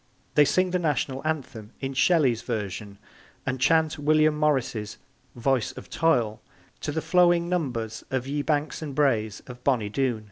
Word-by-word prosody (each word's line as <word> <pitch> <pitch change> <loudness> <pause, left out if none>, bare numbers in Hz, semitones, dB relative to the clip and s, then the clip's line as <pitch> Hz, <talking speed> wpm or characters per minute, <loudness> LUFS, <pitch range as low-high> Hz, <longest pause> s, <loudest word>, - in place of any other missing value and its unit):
They 150 - +6
sing 185 +4 +2
the 180 - +1
National 140 -4 -1
Anthem 125 -8 -4
in 135 0 -4
Shelley's 135 -5 +3
version 105 -3 -4 0.5
and 130 -1 -2
chant 160 +2 +3
William 155 +1 +3
Morris's 130 -8 0 0.4
Voice 130 +1 0
of - - -11
Toil 120 -10 +1 0.4
to 150 - -3
the 160 +2 -2
flowing 175 -1 +4
numbers 125 -11 -2
of 130 -1 -1
Ye 145 +2 -2
Banks 150 +1 -1
and 145 -4 -5
Braes 110 -8 +1
of 125 0 -11
Bonny 120 -7 +1
Doon. 125 0 0
135 Hz, 155 wpm, -26 LUFS, 120-155 Hz, 0.5 s, They